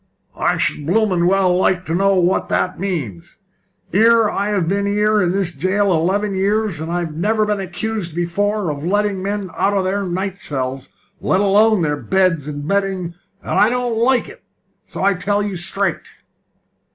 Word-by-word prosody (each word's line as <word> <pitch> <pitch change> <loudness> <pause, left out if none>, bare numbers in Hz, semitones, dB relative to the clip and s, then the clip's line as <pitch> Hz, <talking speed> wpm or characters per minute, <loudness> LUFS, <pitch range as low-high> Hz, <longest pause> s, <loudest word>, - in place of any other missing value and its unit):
"I - - 0
should 145 - 0
blooming 185 -2 +2
well 190 -1 +3
like 185 0 +1
to 160 - -3
know 195 +2 +3
what 180 0 +1
this 185 - +1
means! 150 - -4 0.6
'Ere 225 +2 +5
have - - -6 0.3
I - - -1
been 200 +4 0
in 210 -2 +2
this 190 -2 -1
'ere 140 - -20
jail 195 +1 +2
eleven 195 +5 0
years, 200 -2 0
and 160 +1 -4
I've 170 -3 -3
never 215 +6 +1
been 210 -1 -1
accused 190 -1 -4
before 195 +2 -1
of 145 0 -6
letting 200 +1 0
men 200 -1 -3
out 200 0 +1
of 190 - +1
their 195 +2 -1
night 190 +1 -3
cells, 130 -2 -4 0.3
let 185 - +1
alone 205 0 +3
their 150 -1 0
beds 180 -4 +1
and 145 0 -5
bedding, 195 -3 -1 0.3
and - - -6
I 210 - +5
don't 245 -1 -1
like 245 +3 +2
it, - - -13 0.5
so - - -6
I 200 +1 +4
tell 205 +3 -1
you 205 -2 -3
straight." 195 +3 -1
190 Hz, 175 wpm, -19 LUFS, 175-205 Hz, 0.6 s, Ere